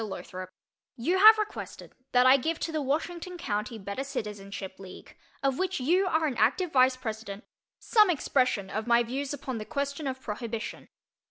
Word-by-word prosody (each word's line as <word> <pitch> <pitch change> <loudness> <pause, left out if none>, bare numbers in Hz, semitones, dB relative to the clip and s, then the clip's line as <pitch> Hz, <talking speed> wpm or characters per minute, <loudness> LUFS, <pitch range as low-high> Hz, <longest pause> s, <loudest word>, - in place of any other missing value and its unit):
LOTHROP: 185 -2 -7 0.5
You 345 +11 +1
have 435 +2 +9
requested 425 -1 -5 0.2
that 250 0 +5
I 260 +1 +8
give 320 +5 -1
to 330 - -2
the 310 -1 -1
Washington 335 +6 -3
County 215 -5 -3
Better 200 +5 -5
Citizenship 205 -7 -6
League, 190 -1 -12 0.3
of 270 -1 +1
which 375 -2 -1
you 355 +9 +2
are 320 -2 +1
an 270 -5 -2
active 275 - +2
vice 255 -1 +4
president, 220 -4 -6 0.3
some 425 -4 +4
expression 255 - +1
of 215 +2 -3
my 235 0 +4
views 265 +4 -4
upon 265 -4 -4
the - - -4
question 280 +4 -3
of 260 0 -3
Prohibition. 230 -1 -6
260 Hz, 170 wpm, -28 LUFS, 215-315 Hz, 0.5 s, have